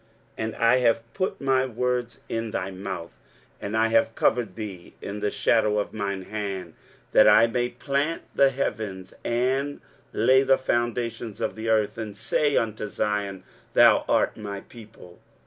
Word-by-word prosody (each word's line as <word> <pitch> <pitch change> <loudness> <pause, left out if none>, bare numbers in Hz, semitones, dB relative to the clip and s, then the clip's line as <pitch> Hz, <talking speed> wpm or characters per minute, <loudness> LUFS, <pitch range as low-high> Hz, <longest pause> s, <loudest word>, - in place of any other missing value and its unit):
23:051:016 110 - -1
And 110 - -6
I 115 +2 +4
have 115 -2 +1
put 185 - -2
my 130 -1 +2
words 125 0 -2
in 115 0 -3
thy 95 -2 -3
mouth, 95 -3 -6 0.5
and 105 +2 -2
I 115 0 +3
have 115 0 +2
covered 110 -5 +1
thee 100 -6 -8
in 100 +1 -6
the 105 - 0
shadow 105 0 +2
of 105 - -2
mine 100 -3 -3
hand, 95 -4 -5 0.4
that - - +6
I 115 - +7
may 120 +1 -1
plant 140 +6 -2
the 140 - +5
heavens, 105 -8 -4
and 130 +4 0 0.3
lay 130 +4 +4
the 135 0 +4
foundations 120 -3 -2
of - - -2
the 110 +1 -4
earth, 110 0 +1
and 105 -2 -6
say 145 +6 +1
unto 110 -1 -1
Zion, 100 -2 -2 0.3
Thou - - +6
art - - +2
my 100 -2 -6
people. 110 -7 -15
115 Hz, 165 wpm, -25 LUFS, 100-125 Hz, 0.5 s, I